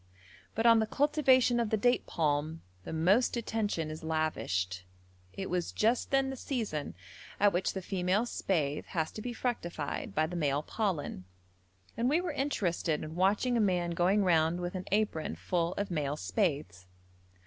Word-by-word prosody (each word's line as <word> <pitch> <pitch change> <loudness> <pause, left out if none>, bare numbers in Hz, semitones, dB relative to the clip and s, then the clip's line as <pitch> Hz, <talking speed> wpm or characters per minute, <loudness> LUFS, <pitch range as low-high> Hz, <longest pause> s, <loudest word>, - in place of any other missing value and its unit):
But 225 - 0
on 230 -1 +7
the 220 - +1
cultivation 260 -3 +3
of 230 -2 0
the 220 - +1
date 245 +4 +2
palm 155 0 -1 0.2
the - - -6
most 190 +11 +3
attention 210 -9 -2
is 155 +1 -8
lavished; 95 - -1 0.5
it 190 - -5
was 180 -1 -1
just 230 +3 +1
then 270 -1 +2
the - - -5
season 220 - -3 0.4
at 205 0 +4
which 180 +2 0
the 190 - -5
female 190 +4 0
spathe 155 -10 -1
has 160 -2 -2
to 215 - -7
be 245 - -4
fructified 175 - -3
by 155 - +3
the 175 +3 -6
male 145 -3 0
pollen, 170 - -2 0.7
and 235 +2 +1
we 305 +4 +3
were 355 -2 -2
interested 195 - -1
in 155 0 -6
watching 200 +8 +2
a - - +2
man 180 -4 +1
going 185 +4 +2
round 165 -1 +3
with 175 0 -3
an 185 -1 -5
apron 205 -6 0
full 170 -1 -1
of 200 -1 -3
male 150 -3 -1
spathes. 140 - -2
180 Hz, 170 wpm, -31 LUFS, 155-225 Hz, 0.7 s, on